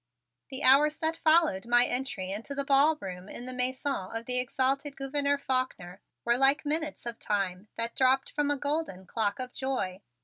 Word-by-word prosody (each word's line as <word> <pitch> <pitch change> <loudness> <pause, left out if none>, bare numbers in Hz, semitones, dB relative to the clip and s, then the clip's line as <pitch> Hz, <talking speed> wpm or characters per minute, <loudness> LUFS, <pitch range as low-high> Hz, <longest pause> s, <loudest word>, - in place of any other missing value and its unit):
The 265 +1 -3
hours 295 +4 +6
that 320 0 -1
followed 315 - +3
my 240 0 +5
entry 245 -8 -2
into 225 +8 -4
the 280 - -1
ballroom 275 - +1
in 240 - -7
the 255 - -4
Mansion 260 +3 0 0.2
of 225 0 -5
the 250 0 +2
exalted 270 +3 -1
Gouverneur 280 +1 -1
Faulkner 255 -10 -3 0.2
were 235 0 +3
like 275 +3 +3
minutes 305 -2 -2
of 235 -1 -6
time 195 -1 -2
that 230 0 -2
dropped 265 +1 +2
from 295 -1 0
a 290 - +1
golden 285 - -3
clock 205 +1 -1
of 255 -1 -5
joy. 210 -9 -3
260 Hz, 175 wpm, -29 LUFS, 225-285 Hz, 0.2 s, hours